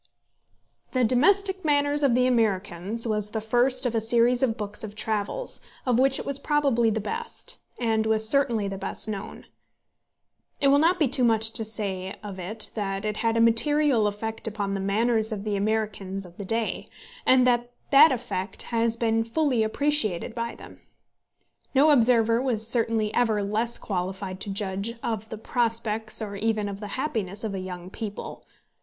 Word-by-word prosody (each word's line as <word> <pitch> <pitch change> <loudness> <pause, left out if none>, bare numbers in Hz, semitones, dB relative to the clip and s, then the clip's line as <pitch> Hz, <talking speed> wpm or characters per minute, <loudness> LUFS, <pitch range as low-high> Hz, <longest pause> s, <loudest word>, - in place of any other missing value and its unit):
The 255 -1 +2
Domestic 380 - +2
Manners 290 -1 +1
of 270 -4 +3
the 250 0 +3
Americans 210 -3 0
was 210 -2 -1
the 220 - -3
first 245 +4 +2
of 245 - 0
a 225 - +1
series 235 +2 +3
of 240 -3 +1
books 210 0 -5
of 210 -1 -7
travels, 220 - -2 0.2
of 250 -2 +2
which 270 +1 +5
it - - -5
was 280 0 -1
probably 280 -6 +2
the 220 0 -1
best, 470 - -5 0.2
and 220 -2 0
was 220 0 +2
certainly 235 -5 +2
the 195 -1 -5
best - - -2
known. 205 -2 -6 1.1
It 280 - +3
will 280 +1 +5
not 340 +4 +3
be 305 - +2
too 260 0 +4
much 225 -1 +4
to 225 - +2
say 195 -3 -4
of 200 -2 -7
it 210 +4 0
that 195 -1 -3
it 210 0 -2
had 230 0 0
a - - +3
material 235 +1 +3
effect 220 +2 -4
upon 205 -2 -3
the 195 - -2
manners 220 +3 +1
of 205 -2 -4
the 210 -1 -2
Americans 200 -2 -2
of 175 0 -15
the 200 - -6
day, 225 +3 -2 0.4
and 255 -1 +5
that 240 -1 +2 0.2
that 290 +2 +8
effect 230 -6 -3
has 230 0 +1
been 225 -1 +1
fully 250 +1 0
appreciated 220 - -1
by 235 0 -4
them. - - -13 1.0
No 295 +3 +6
observer 230 -3 +4
was 225 -4 0
certainly 225 -2 +1
ever 220 -4 +1
less 220 +4 -1
qualified 185 0 -4
to 205 - -5
judge 200 +3 -3
of 220 -2 -3
the 220 - -6
prospects 225 -1 -1
or 200 -1 -6
even 215 0 -1
of 200 -1 -6
the 210 - -6
happiness 215 -8 -3
of 215 -3 -3
a 195 - -3
young 180 -1 -7
people. 210 -2 -7
225 Hz, 175 wpm, -25 LUFS, 210-250 Hz, 1.1 s, that